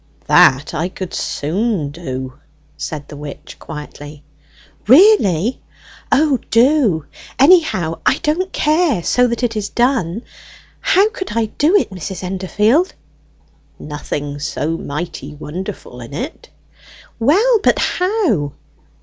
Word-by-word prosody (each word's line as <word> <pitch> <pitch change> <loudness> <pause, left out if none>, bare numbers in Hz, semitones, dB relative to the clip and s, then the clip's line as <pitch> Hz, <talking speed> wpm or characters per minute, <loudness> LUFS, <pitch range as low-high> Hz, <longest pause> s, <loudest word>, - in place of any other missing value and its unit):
"That 135 +2 +4
I 170 +3 -1
could 185 -1 -7
soon 170 0 -2
do," 130 -5 -6 0.4
said 145 -2 -6
the - - -10
witch 145 0 -9
quietly. 150 -1 -9 0.6
"Really? 255 - +5 0.5
O, 285 -3 +3
do; 230 - +3 0.3
anyhow 275 - +3
I 265 - +3
don't 355 +5 0
care 305 - +1
so 250 +7 +3
that 235 +1 -3
it 230 -2 0
is 210 -2 -3
done! 235 -5 0 0.6
How 390 +3 +3
could 375 - -5
I 230 - +2
do 315 +7 +4
it, 405 - +2
Mrs. 185 0 -6
Endorfield?" 210 - +1 0.8
"Nothing 145 -1 -5
so 150 +2 -2
mighty 150 -2 -6
wonderful 155 -4 -7
in 120 +4 -9
it." 270 - -6 0.7
"Well, 415 - +4
but - - +3
how?" 360 - 0
195 Hz, 115 wpm, -18 LUFS, -, 0.8 s, Really